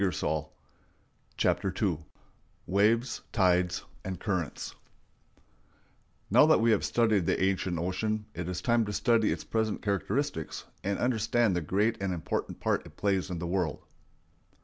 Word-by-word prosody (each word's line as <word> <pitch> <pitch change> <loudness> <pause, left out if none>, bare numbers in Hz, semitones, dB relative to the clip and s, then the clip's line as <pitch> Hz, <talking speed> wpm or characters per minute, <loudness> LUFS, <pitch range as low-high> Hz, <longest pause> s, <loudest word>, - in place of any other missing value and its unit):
] - - -37
CHAPTER 95 -2 +1
II 90 -8 +1 0.7
WAVES, 110 +6 +2
TIDES, 90 -3 +2 0.2
AND 95 -1 -5
CURRENTS 90 -7 -3 1.6
Now 125 +8 +7
that 160 - +5
we 115 0 +4
have 105 - +2
studied 110 -7 +2
the - - +2
ancient 95 -2 0
ocean, 105 +5 -1
it 90 0 -4
is 90 0 -3
time 120 -1 +3
to 105 - -4
study 115 -1 +3
its - - -3
present 110 -1 -1
characteristics 100 - -2 0.2
and 100 +1 0
understand 120 -3 +2
the 90 - 0
great 105 +7 0
and 95 -2 -1
important 80 - -3
part - - 0
it - - -17
plays 95 -2 0
in 90 - -3
the 85 - -4
world. 85 -3 -1
100 Hz, 145 wpm, -29 LUFS, 90-110 Hz, 1.6 s, Now